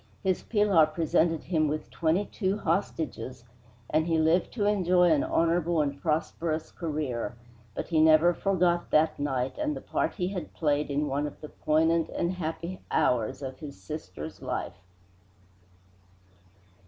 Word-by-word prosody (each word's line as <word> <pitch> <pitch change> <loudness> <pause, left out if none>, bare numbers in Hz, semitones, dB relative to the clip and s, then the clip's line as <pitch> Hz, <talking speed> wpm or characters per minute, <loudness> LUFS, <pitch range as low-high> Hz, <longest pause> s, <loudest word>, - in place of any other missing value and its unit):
His 190 -2 +1
Pilar 205 -8 +3
presented 165 0 +1
him 160 -3 +1
with 155 +1 -4
twenty 170 +5 +1
two 195 -1 -2
hostages, 155 - -2 0.4
and 155 +2 +1
he 165 -1 +2
lived 160 +3 +2
to 210 -4 -1
enjoy 180 -4 +3
an 150 -3 +3
honorable 170 0 +1
and 140 -2 -1
prosperous 160 0 -1
career, 145 -9 -3 0.4
but - - -4
he 160 -3 +3
never 160 +2 +6
forgot 175 -2 +1
that 155 0 +2
night 135 - -2
and 300 -1 -1
the - - -5
part - - -1
he 180 -2 -1
had 190 -3 -6
played 150 -2 0
in 145 +1 0
one 145 +2 -1
of 145 - -10
the 150 - -9
poignant 160 +1 +1
and 170 - -1
happy 170 +1 -5
hours 125 +3 +1
of 130 -1 -6
his 145 -3 -9
sister's 95 - -7
life. - - -4
160 Hz, 150 wpm, -28 LUFS, 150-175 Hz, 0.4 s, never